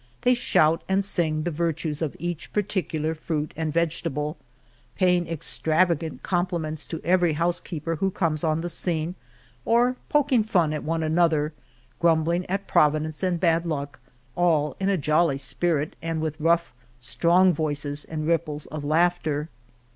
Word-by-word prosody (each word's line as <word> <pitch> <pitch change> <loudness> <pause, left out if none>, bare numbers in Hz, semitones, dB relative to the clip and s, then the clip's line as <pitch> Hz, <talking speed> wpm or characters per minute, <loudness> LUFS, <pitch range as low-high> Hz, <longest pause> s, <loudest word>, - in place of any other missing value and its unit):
They 250 - +5
shout 165 -9 +2
and 195 +1 +2
sing 160 -5 0
the 175 - -1
virtues 160 -1 -2
of 155 -4 -2
each 175 -2 -5
particular 170 -6 -1
fruit 155 -1 -3
and 160 -1 -2
vegetable, 155 -2 -1 0.6
paying 180 -2 +2
extravagant 165 0 0
compliments 170 -4 -2
to 165 - -5
every 175 -2 +3
housekeeper 165 0 -2
who 195 +4 +1
comes 160 -5 -1
on 160 0 +1
the 175 - -3
scene 165 -1 -1 0.5
or 245 - +3
pok 295 -1 +2
ing 245 -4 +5
fun 180 -8 +1
at 150 - -4
one 165 +1 -1
another, 160 -1 +2 0.5
grumbling 170 +1 +2
at 195 +2 -2
Provi 150 0 +4
dence 155 0 -5
and 180 -2 0
bad 165 -1 +2
luck, 145 -3 -4 0.4
all 155 -5 +2
in 195 0 +1
a 195 - +2
jolly 155 -1 +2
spirit, 150 +2 -1
and 165 -1 -2
with 155 0 -3
rough, 170 -1 +2 0.3
strong 175 +9 +3
voices 145 -2 -3
and 155 -1 -5
ripples 155 -3 -1
of 155 -1 -6
laughter. 155 -1 +1
165 Hz, 155 wpm, -25 LUFS, 155-175 Hz, 0.6 s, They